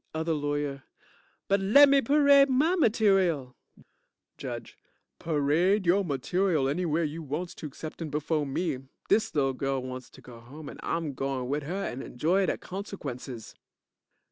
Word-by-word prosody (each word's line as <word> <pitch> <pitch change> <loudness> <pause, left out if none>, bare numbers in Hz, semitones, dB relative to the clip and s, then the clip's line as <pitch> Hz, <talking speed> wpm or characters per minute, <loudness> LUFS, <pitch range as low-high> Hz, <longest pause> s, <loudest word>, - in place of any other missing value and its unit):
OTHER 160 +1 0
LAWYER 145 -2 -2 0.6
But, 200 +1 +3
lemme 275 +8 +6
parade 280 +1 +5
my 300 +8 +3
material 195 - +2 0.8
JUDGE - - -6 0.4
Parade 165 +6 +1
yo' 190 +4 +3
material 160 +1 0
anywhere 165 +2 0
you 155 +2 -4
wants 160 +4 -4
to 155 - -7
exceptin' 155 +3 -7
befo' 150 +1 -1
me. 140 0 -2 0.3
Dis 220 - +2
lil 135 -2 +2
girl 135 0 -2
wants 130 0 -7
to - - -16
go 120 -2 -12
home 140 +6 -10
and - - -11
I'm 165 -4 -2
goin' 135 -1 -3
with 145 +2 -1
her 185 +7 -3
and 125 +2 -5
enjoy 180 +9 0
de - - 0
consequences. 140 - -7
155 Hz, 145 wpm, -28 LUFS, 135-195 Hz, 0.8 s, lemme